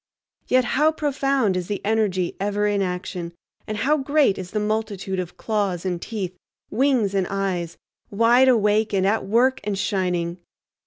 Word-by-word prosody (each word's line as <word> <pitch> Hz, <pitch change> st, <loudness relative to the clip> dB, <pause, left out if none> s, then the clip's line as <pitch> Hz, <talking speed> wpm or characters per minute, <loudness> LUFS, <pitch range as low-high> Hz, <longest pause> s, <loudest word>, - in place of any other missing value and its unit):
Yet 255 Hz, -1 st, +3 dB
how 300 Hz, +6 st, +3 dB
profound 275 Hz, -8 st, 0 dB
is 180 Hz, -1 st, -2 dB
the 205 Hz, -, -2 dB
energy 205 Hz, -5 st, 0 dB
ever 205 Hz, +1 st, 0 dB
in 205 Hz, -1 st, +1 dB
action, 180 Hz, -2 st, -4 dB, 0.3 s
and 215 Hz, -, -3 dB
how 280 Hz, +8 st, +2 dB
great 280 Hz, -7 st, +2 dB
is 180 Hz, -1 st, -6 dB
the 210 Hz, -, -2 dB
multitude 210 Hz, -3 st, -2 dB
of 180 Hz, -1 st, -5 dB
claws 200 Hz, -5 st, -1 dB
and 180 Hz, -2 st, -2 dB
teeth, 190 Hz, -5 st, -4 dB, 0.4 s
wings 240 Hz, -4 st, +2 dB
and 190 Hz, -2 st, +1 dB
eyes, 190 Hz, -4 st, -2 dB, 0.3 s
wide 235 Hz, +5 st, +4 dB
awake 215 Hz, -3 st, +3 dB
and 190 Hz, -1 st, +2 dB
at 210 Hz, +1 st, +1 dB
work 245 Hz, +5 st, +3 dB
and 205 Hz, -1 st, -2 dB
shining! 180 Hz, -3 st, -1 dB
205 Hz, 160 wpm, -23 LUFS, 185-230 Hz, 0.4 s, wide